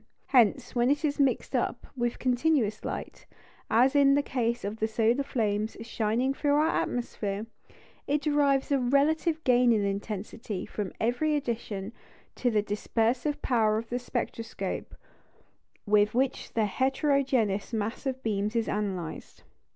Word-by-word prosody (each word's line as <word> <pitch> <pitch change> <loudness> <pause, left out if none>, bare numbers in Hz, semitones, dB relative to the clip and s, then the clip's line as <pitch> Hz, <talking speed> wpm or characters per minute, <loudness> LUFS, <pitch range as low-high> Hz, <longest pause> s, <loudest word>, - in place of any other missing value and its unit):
Hence, 245 0 +3
when 240 0 +2
it 290 +2 +1
is 290 -1 -1
mixed 275 -2 +1
up - - -1
with 240 -2 -1
continuous 250 -4 +1
light - - -6 0.4
as 255 +5 +4
in 280 -1 +6
the 285 - +2
case 235 -3 -1
of 205 +2 -4
the 220 - 0
solar 225 +4 +2
flames 220 -5 -1
shining 230 +3 0
through 285 +1 +1
our 305 +2 +3
atmosphere 215 -7 -2 0.6
it 290 +1 0
derives 285 -2 +2
a 280 - +3
relative 310 +5 +2
gain 245 -1 +4
in 215 -3 +2
intensity 205 +1 -4
from 205 -3 -4
every 250 +7 +1
addition 225 -6 -3 0.4
to 250 - +1
the 215 -3 +1
dispersive 230 +7 -1
power 220 -4 +2
of 225 +1 -5
the 245 - -1
spectroscope 230 -2 -4 0.9
with 210 +1 +3
which 265 +1 -1
the 220 -2 +2
heterogeneous 260 -3 +1
mass 225 +4 -3
of 260 0 -3
beams 210 0 -1
is 230 -1 +1
analysed. 190 -6 -4
240 Hz, 145 wpm, -28 LUFS, 215-275 Hz, 0.9 s, in